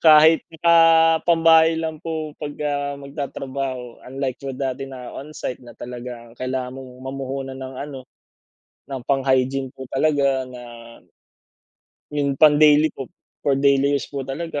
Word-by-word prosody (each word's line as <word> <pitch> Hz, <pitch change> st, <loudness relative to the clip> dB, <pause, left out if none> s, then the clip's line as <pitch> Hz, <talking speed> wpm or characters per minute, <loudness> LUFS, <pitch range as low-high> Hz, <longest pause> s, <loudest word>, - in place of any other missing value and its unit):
Kahit 155 Hz, 0 st, +7 dB, 0.2 s
naka 170 Hz, 0 st, +6 dB, 0.5 s
pambahay 165 Hz, -1 st, +6 dB
lang 160 Hz, -1 st, -3 dB
po 160 Hz, -2 st, -4 dB
'pag, 145 Hz, -1 st, -5 dB
ah, 145 Hz, -1 st, -1 dB
magtatrabaho 135 Hz, -3 st, -5 dB
unlike 135 Hz, -1 st, -3 dB
po 135 Hz, -1 st, -5 dB
dati 135 Hz, 0 st, -3 dB
na 125 Hz, -2 st, -8 dB
on-site 140 Hz, -3 st, -6 dB
na 120 Hz, -, -13 dB
talaga, 120 Hz, -1 st, -8 dB
ah, -, -, -17 dB
kailangan 130 Hz, 0 st, -3 dB
mong 130 Hz, -1 st, -10 dB
mamuhunan 135 Hz, 0 st, -5 dB
ng 130 Hz, 0 st, -7 dB
ano, 140 Hz, -2 st, -7 dB, 0.9 s
ng 135 Hz, -2 st, -5 dB
pang 135 Hz, -1 st, +1 dB
hygiene 130 Hz, 0 st, +1 dB
po 130 Hz, -, -9 dB
talaga 140 Hz, -2 st, +2 dB
na, 125 Hz, -1 st, -10 dB, 1.5 s
yung 140 Hz, -2 st, 0 dB
pang 150 Hz, 0 st, +7 dB
daily 150 Hz, +1 st, +6 dB
po, 135 Hz, -, -7 dB, 0.4 s
for 140 Hz, -, +4 dB
daily 140 Hz, 0 st, +3 dB
use -, -, -3 dB
po 140 Hz, -1 st, -4 dB
talaga, 145 Hz, +2 st, -4 dB
135 Hz, 150 wpm, -22 LUFS, 130-150 Hz, 1.5 s, Kahit